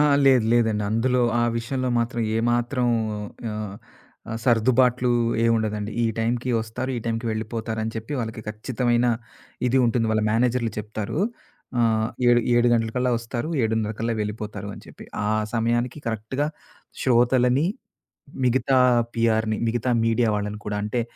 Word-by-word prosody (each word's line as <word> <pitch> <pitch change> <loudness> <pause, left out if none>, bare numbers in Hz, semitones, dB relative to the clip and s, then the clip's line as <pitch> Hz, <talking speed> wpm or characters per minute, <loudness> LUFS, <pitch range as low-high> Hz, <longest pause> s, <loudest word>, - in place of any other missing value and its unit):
ఆ! - - +6 0.2
లేదు 130 -4 +5
లేదండి. 110 -3 +2
అందులో 125 +3 +2 0.2
ఆ - - +3
విషయంలో 130 +2 -2
మాత్రం 120 0 -1
ఏమాత్రం 120 +2 +1 0.6
ఆహ్, 105 -2 -5 0.6
ఆహ్, 115 - -3
సర్దుబాట్లు 125 +1 +3 0.3
ఏముండదండి. 110 -2 0
ఈ - - +3
టైంకి 120 +2 0
ఒస్తారు. 115 +4 -4
ఈ - - -3
టైంకి 115 +1 -2
వెళ్ళిపోతారని 110 0 -3
చెప్పి 110 +6 -5
వాళ్ళకి 110 -1 -5
ఖచ్చితమైన 120 +2 0 0.6
ఇది 130 - +3
ఉంటుంది. 115 -1 +1
వాళ్ళ 110 - +1
మేనేజరులు 120 0 +1
చెప్తారు. 105 +5 -4 0.6
ఆహ్, 110 -1 +2 0.2
"ఏడు 120 0 +5
ఏడు 120 0 +4
గంటల 115 -1 +2
కల్లా 125 0 +1
ఒస్తారు. 120 +4 -4
7:30 110 -1 0
కల్లా 115 0 0
వెళ్ళిపోతారు" 105 -1 -5
అని - - -12
చెప్పి. - - -12 0.2
ఆ - - +1 0.3
సమయానికి 120 +3 0
కరెక్ట్‌గా 115 +6 -2 0.6
శ్రోతలని, 125 +3 +3 0.8
మిగతా 130 +2 +2 0.4
పీఆర్‌ని, 110 -1 +1
మిగతా 120 +2 0
మీడియా 115 0 +2
వాళ్ళని 105 0 -4
కూడా 105 0 -2
అంటే 110 +3 -1
115 Hz, 135 wpm, -24 LUFS, 110-125 Hz, 0.8 s, ఆ